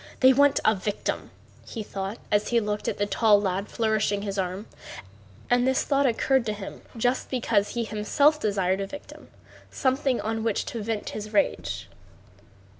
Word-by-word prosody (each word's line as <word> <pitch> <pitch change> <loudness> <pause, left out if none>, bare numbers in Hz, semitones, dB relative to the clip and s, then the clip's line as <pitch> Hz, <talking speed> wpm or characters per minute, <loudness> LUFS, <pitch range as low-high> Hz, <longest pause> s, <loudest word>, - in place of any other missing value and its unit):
They 260 0 +8
want 285 +1 +4
a 220 - +6
victim," 205 +1 -3 0.3
he 225 - -6
thought 195 +1 -5
as 205 0 +2
he 235 - +3
looked 210 -1 -3
at - - -1
the 205 - +1
tall 205 +1 +4
lad 195 0 -1
flourishing 215 -2 0
his 200 -2 -3
arm. 185 +3 -3 0.8
And 245 +1 +3
this 265 0 +2
thought 280 -1 +2
occurred 260 +2 +2
to 215 - 0
him 205 -2 -8 0.2
just 245 +3 0
because 225 -5 0
he 235 - 0
himself 225 +9 +2
desired 195 -5 0
a 195 - -3
victim, 290 +7 -11 0.4
something 265 -1 +1
on 225 0 -2
which 225 -3 0
to 230 - -5
vent 215 0 -3
his 215 0 -7
rage. 295 - 0
220 Hz, 170 wpm, -26 LUFS, 205-250 Hz, 0.8 s, They